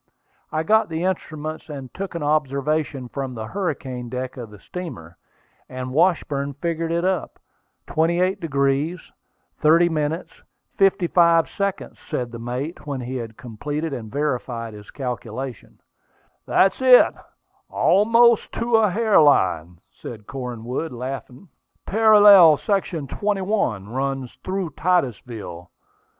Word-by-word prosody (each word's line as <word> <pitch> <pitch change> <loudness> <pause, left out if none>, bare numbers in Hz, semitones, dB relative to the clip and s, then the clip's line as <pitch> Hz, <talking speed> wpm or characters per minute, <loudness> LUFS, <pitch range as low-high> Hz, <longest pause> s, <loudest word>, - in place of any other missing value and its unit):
I 155 - -1
got 220 +4 +3
the 160 +1 -3
instruments, 155 -4 -4
and 135 -4 -8
took 195 -2 -6
an 170 - -3
observation 145 -2 -1
from 135 0 -5
the 110 -1 -5
hurricane 130 - -4
deck 130 +1 -5
of 120 -4 -8
the 105 - -13
steamer; 95 - -8 0.5
and 130 0 -6
Washburn 145 -4 +1
figured 165 +2 -2
it 170 +1 0
up. 185 -2 -1 0.5
"28° 165 -2 0 0.5
37' 160 0 +2 0.5
55"," 175 -3 +3 0.6
said 120 -2 -3
the 115 - -8
mate, 130 +8 -5
when 140 -3 -3
he 125 +2 -4
had 115 -2 -7
completed 145 +5 -4
and 110 -5 -6
verified 125 -5 -3
his 105 -1 -12
calculation. 125 -1 -6 0.7
"That's 195 +6 +3
it, 255 -1 +7 0.6
almost 230 +3 +4
to 230 0 +1
a 215 -2 +3
hair 220 +2 +3
line," 90 - +2
said 110 -3 -10
Cornwood, 125 +3 -5
laughing. 125 - -7 0.4
"Parallel 205 -6 +7
section 195 -4 -1
line - - -8
21 195 - -1
runs 135 0 -3
through 185 -3 -3
Titusville. 120 - -2
150 Hz, 115 wpm, -22 LUFS, 125-180 Hz, 0.7 s, it